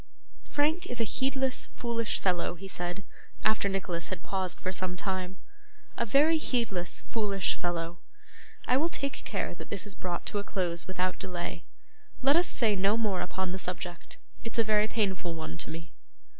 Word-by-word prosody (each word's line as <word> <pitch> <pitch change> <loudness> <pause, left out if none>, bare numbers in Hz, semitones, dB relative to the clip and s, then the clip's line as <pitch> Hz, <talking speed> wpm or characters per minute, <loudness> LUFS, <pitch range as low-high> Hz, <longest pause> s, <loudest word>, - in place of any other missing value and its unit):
'Frank 310 +4 +2
is 245 - -2
a - - +4
heedless, 265 +3 +1
foolish 230 -2 0
fellow,' 180 -2 +2
he 195 +3 -8
said, 180 +1 -3 0.4
after 215 -2 +4
Nicholas 180 -3 -1
had 185 -3 -4
paused 190 -3 -1
for 185 - -1
some 185 -1 -2
time; 185 -1 -2 0.6
'a 235 - 0
very 305 +7 +6
heedless, 230 - 0
foolish 200 -4 +1
fellow. 175 -1 -2 0.7
I 250 - +4
will 320 +5 +3
take 280 -4 -2
care - - -1
that - - -9
this 200 -1 -2
is 205 - -6
brought 180 -2 -3
to 205 - 0
a - - -2
close 175 -4 -1
without 185 0 0
delay. 175 -2 -4 0.6
Let 275 +2 +7
us 350 +2 +5
say 220 -4 +3
no 200 +3 +4
more 205 -5 +1
upon 185 +1 -1
the 190 - -3
subject; 180 -1 -4 0.3
it's 230 0 -4
a 230 - +6
very 215 0 +4
painful 190 -6 0
one 160 -1 -4
to - - -5
me. 165 +1 -7
195 Hz, 175 wpm, -31 LUFS, 180-230 Hz, 0.7 s, Let